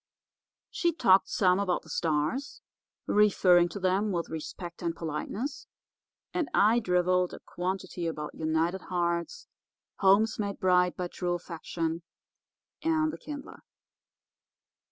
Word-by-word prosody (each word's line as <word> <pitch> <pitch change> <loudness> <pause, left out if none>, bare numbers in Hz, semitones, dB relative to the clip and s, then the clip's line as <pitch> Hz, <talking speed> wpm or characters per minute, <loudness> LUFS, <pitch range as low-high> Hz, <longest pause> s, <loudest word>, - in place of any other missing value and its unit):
She 340 -1 +1
talked 195 - +4
some 185 -1 +3
about 185 -3 0
the - - -16
stars, 160 - -1 0.4
referring 185 -4 +4
to 200 - -6
them 190 +3 +1
with 170 -2 -2
respect 170 +2 -7
and 170 -1 -2
politeness, 195 - -4 0.7
and 340 -5 -1
I 220 +3 +5
drivelled 180 -2 +1
a - - -11
quantity 180 -1 -4
about 150 -2 -4
united 160 +4 0
hearts, 175 - -2 0.5
homes 210 +3 +4
made 200 -1 -3
bright 180 -1 +3
by 180 - -2
true 175 -1 -2
affection, 165 -1 -4 0.8
and 315 -1 +1
the - - -6
Kindler. 290 -2 -8
180 Hz, 120 wpm, -29 LUFS, 170-210 Hz, 0.8 s, I